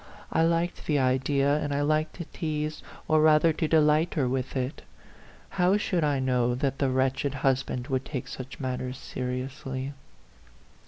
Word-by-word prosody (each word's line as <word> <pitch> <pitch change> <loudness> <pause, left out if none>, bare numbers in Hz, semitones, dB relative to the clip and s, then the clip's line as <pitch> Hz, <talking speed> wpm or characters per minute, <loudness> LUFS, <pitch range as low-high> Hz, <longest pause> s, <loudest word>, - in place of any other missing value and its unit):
I - - +2
liked 170 +1 0
the 150 - +2
idea, 135 +2 +2
and 145 -1 -2
I 140 0 0
liked 155 +1 +1
to 170 - -6
tease, 155 -1 -3 0.3
or 155 -1 +4
rather 155 +1 +5
to 160 +1 -1
delight 155 +1 +3
her 140 -5 +1
with 130 +1 -2
it. 130 +2 -3 0.8
How 185 +3 +4
should 180 -5 0
I 145 -2 +1
know 125 -2 +1
that 135 +1 -1
the 135 - +2
wretched 135 +2 0
husband 130 -2 +1
would 130 -1 0
take 135 -5 -5
such 130 0 -8
matters 130 -1 -3
seriously 130 +1 -4
140 Hz, 160 wpm, -27 LUFS, 130-155 Hz, 0.8 s, rather